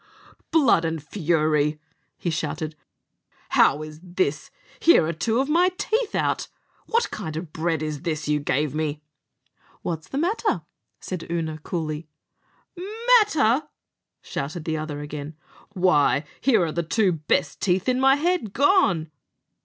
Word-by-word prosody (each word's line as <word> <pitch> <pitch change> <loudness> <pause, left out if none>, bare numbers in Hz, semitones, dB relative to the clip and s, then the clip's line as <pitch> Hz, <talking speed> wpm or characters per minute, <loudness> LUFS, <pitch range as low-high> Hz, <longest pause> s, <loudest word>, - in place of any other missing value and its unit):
"Blood 285 - +4
and 165 0 -1
fury!" 155 -3 +1 0.4
he 170 - -2
shouted; 155 0 -3 0.7
"how 150 +3 +4
is 155 0 -9
this? 175 -5 -2 0.3
Here 330 - +6
are 165 - -1
two 220 +9 0
of 270 - +1
my 345 +4 +4
teeth 445 0 -1
out! - - 0 0.4
What 465 +1 +1
kind 160 -7 -5
of 160 -1 -7
bread 160 -1 -1
is 150 -2 -4
this 155 -3 -3
you 150 0 +2
gave 145 0 0
me?" 155 -1 -2 0.8
"What's 160 -2 -4
the 270 - -5
matter?" 415 +8 0 0.4
said 180 -3 -6
Oonagh 160 -2 -3
coolly. 155 -2 -4 1.1
"Matter!" 300 - +2 0.6
shouted 155 +4 -5
the 160 - -1
other 155 -2 -4
again; 150 +1 -6 0.4
"why, 160 -7 +3 0.2
here 230 -8 +3
are 160 - -3
the 170 - -1
two 185 +4 +2
best 150 -2 -1
teeth 185 +1 +1
in 255 0 +2
my 270 +1 +5
head 320 - 0
gone." 235 - +3
165 Hz, 140 wpm, -24 LUFS, 155-225 Hz, 1.1 s, Here